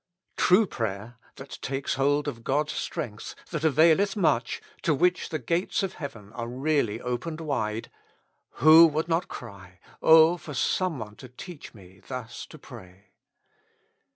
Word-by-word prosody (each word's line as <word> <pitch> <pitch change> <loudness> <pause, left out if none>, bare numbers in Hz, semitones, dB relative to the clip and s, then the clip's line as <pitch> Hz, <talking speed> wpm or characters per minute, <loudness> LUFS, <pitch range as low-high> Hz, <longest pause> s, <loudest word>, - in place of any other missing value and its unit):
True 190 +5 +4
prayer, 115 - -5 0.2
that 135 +1 -10
takes 135 +1 -2
hold 145 +2 +1
of 115 -5 -5
God's 150 +4 0
strength, 120 -11 -5 0.2
that 155 -3 -3
availeth 160 - +4
much, 160 - +1 0.2
to 155 - +2
which 180 +4 +1
the 160 - -2
gates 170 +9 -1
of 190 - -2
heaven 115 -9 -9
are 115 0 -5
really 130 -3 0
opened 125 +7 -4
wide 115 -8 -3 0.3
— - - -47
who 160 +2 +9
would 155 +1 -2
not 170 +1 0
cry, 95 -6 -11 0.2
Oh 160 +2 +6
for 150 -4 -9
some 180 +4 0
one 105 -2 -8
to 130 - -11
teach 145 +2 -11
me 95 -2 -16
thus 125 -3 -7
to 155 - -13
pray? 100 -8 -14
140 Hz, 155 wpm, -26 LUFS, 115-160 Hz, 0.3 s, who